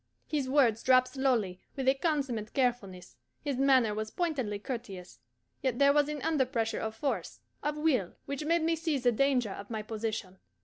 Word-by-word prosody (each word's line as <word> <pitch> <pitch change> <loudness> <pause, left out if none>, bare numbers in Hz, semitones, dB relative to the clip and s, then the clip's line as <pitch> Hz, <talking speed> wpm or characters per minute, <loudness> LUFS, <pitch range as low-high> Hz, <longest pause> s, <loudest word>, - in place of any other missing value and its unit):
His 285 -4 -2
words 245 -6 +3
dropped 255 0 +4
slowly, 245 -9 0 0.2
with 265 -2 -3
a 265 - +6
consummate 270 -8 -2
carefulness, 235 -9 -1 0.3
his 285 -4 -2
manner 260 -5 +4
was 215 +1 -3
pointedly 265 - -2
courteous, 200 - -7 0.4
yet 255 -3 0
there 280 +1 +5
was 295 0 +3
an 300 -2 -4
underpressure 255 -7 0
of 220 0 -4
force, 275 +5 -3 0.2
of 295 0 -2
will, 275 - +1
which 280 +1 -4
made 335 +2 +2
me 330 +1 +2
see 325 -2 -1
the 245 -2 +2
danger 250 -3 +2
of 200 +1 -8
my 220 -2 -3
position. 215 -3 -4
255 Hz, 175 wpm, -30 LUFS, 220-285 Hz, 0.4 s, a